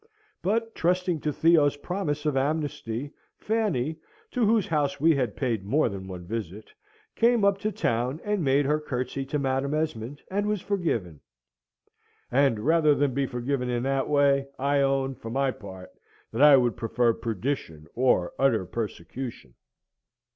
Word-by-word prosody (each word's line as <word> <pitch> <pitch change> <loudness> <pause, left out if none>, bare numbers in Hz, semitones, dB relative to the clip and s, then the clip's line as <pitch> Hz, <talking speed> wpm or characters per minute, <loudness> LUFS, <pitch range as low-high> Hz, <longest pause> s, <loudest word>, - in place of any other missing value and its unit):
But, 225 +4 0
trusting 180 -1 0
to 150 - -1
Theo's 150 -2 +3
promise 155 -3 -3
of 150 -2 +1
amnesty, 145 -2 -2 0.2
Fanny 185 - -1 0.3
(to 250 - 0
whose 220 -2 +3
house 145 -3 0
we 165 +3 +5
had 125 -6 -1
paid 115 -7 -1
more 125 +8 +2
than 95 -2 -7
one 90 -2 -8
visit) 105 0 -6 0.4
came 235 -2 +3
up 200 0 +3
to 215 +1 -1
town, 125 - -1
and 210 -4 -1
made 140 +1 +3
her 150 +2 +2
curtsey 135 -2 -3
to 150 - -2
Madam 135 +1 0
Esmond, 145 -4 -3
and 205 +2 0
was 210 -1 0
forgiven. 155 - -2 1.1
And 130 -4 +3
rather 155 +2 +4
than 140 -2 +1
be 135 +1 0
forgiven 125 0 -2
in 120 0 -1
that 135 0 0
way, 140 -1 +3
I 140 +1 +1
own, 135 -1 +1
for 115 - -9
my 135 +2 +1
part, 95 -5 -11 0.4
that 115 - -2
I 145 -2 +9
would 120 -3 +1
prefer 115 +1 +1
perdition 110 - -4
or 125 -8 +2
utter 120 -8 +2
persecution. 110 - -6
140 Hz, 155 wpm, -26 LUFS, 120-155 Hz, 1.1 s, I